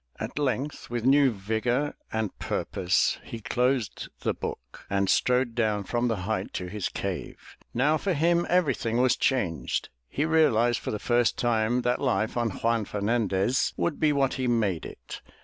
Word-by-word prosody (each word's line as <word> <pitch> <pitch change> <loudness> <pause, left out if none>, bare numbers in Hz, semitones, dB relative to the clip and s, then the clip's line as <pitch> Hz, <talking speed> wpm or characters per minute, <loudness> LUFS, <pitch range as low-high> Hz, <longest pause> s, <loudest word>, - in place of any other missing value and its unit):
At - - -4
length 140 +1 -2
with 120 -1 -3
new 140 +1 +6
vigor 115 +7 -1 0.2
and 110 -2 -2
purpose 90 0 0
he 115 - -7
closed 125 0 -1
the - - 0
book - - -7
and 100 0 +1
strode 125 +2 +2
down 110 -3 0
from 120 +4 0
the 115 - +1
height 100 -3 -2
to 90 - -3
his 95 +1 -3
cave. - - -6 0.2
Now 145 +6 +2
for 190 +3 -1
him 170 +2 +2
everything 140 -10 +1
was 130 0 +4
changed. 85 - -1 0.2
He 150 - -1
realized 120 -8 +3
for - - -5
the 105 - -2
first 120 +1 +1
time 120 +1 +1
that 125 0 0
life 110 -5 0
on 120 -1 +1
Juan 115 +2 0
Fernandez 105 +2 0
would 170 - -1
be 155 -1 +3
what 140 -2 +1
he 130 -2 -2
made 105 -8 0
it. - - -10
120 Hz, 165 wpm, -27 LUFS, 105-135 Hz, 0.2 s, new